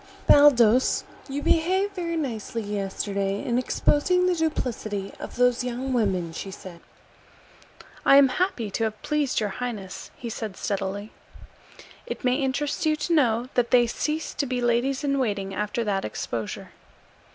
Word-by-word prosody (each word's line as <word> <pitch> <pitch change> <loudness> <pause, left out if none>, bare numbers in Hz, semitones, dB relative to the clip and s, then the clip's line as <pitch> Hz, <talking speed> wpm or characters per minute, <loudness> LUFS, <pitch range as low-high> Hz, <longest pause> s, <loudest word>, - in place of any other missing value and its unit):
"Baldos, 255 -4 +5 0.3
you 285 +1 -3
behaved 375 +5 +2
very 340 -3 -3
nicely 230 -5 -3
yesterday 200 -1 -2
in 240 0 +1
exposing 360 +7 +2
the 365 - +3
duplicity 235 - -2
of - - -8
those 250 0 +3
young 250 +2 -3
women," 190 -8 0
she 195 - -6
said. 185 -2 -10 1.2
"I - - +6
am 275 -1 +7
happy 255 - -1
to 225 - 0
have 215 -1 -4
pleased 300 -3 0
your 210 -2 -1
highness," 205 -3 -6
he 240 - -7
said 215 -4 -5
steadily. 200 +1 -3 1.0
"It - - -6
may 250 0 +2
interest 280 +4 -1
you 310 -1 +3
to 305 +3 -2
know 245 -5 +2
that 240 -1 +1
they 245 -1 +5
ceased 305 +6 -3
to 280 - +1
be 250 0 -1
ladies 245 +4 +1
in 275 -1 +1
waiting 200 -6 -1
after 210 +3 -2
that 200 -3 -1
exposure." 110 0 -5
245 Hz, 150 wpm, -25 LUFS, 205-285 Hz, 1.2 s, am